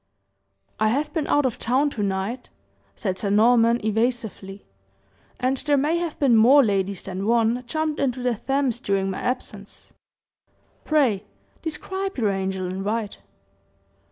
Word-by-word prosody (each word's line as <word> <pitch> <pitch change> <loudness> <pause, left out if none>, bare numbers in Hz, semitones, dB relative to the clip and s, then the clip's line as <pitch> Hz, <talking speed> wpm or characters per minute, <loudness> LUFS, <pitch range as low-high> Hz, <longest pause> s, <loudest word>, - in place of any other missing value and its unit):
"I 215 - +3
have 280 +7 -1
been 315 -4 -1
out 290 -1 +2
of 250 - -2
town 270 +5 +1
to 220 - -4
night," 200 +5 -3 0.5
said 185 -1 -3
Sir 200 - -2
Norman, 230 +3 +4
evasively, 220 -3 -2 0.7
"and 255 +2 0
there 290 +1 +1
may 300 +5 +1
have 340 -2 -3
been 265 -5 +3
more 255 +6 +7
ladies 195 -2 -1
than 190 +2 -4
one 235 +1 +2
jumped 310 +2 -2
into 255 -2 -1
the 250 -1 +1
Thames 265 +1 -1
during 195 -5 -1
my - - -5
absence. 210 -5 -5 0.9
Pray, 250 -10 +2 0.4
describe 380 +4 -4
your 215 -5 +1
angel 190 -1 -2
in 185 +1 -4
white." 210 0 -3
235 Hz, 145 wpm, -23 LUFS, 200-275 Hz, 0.9 s, more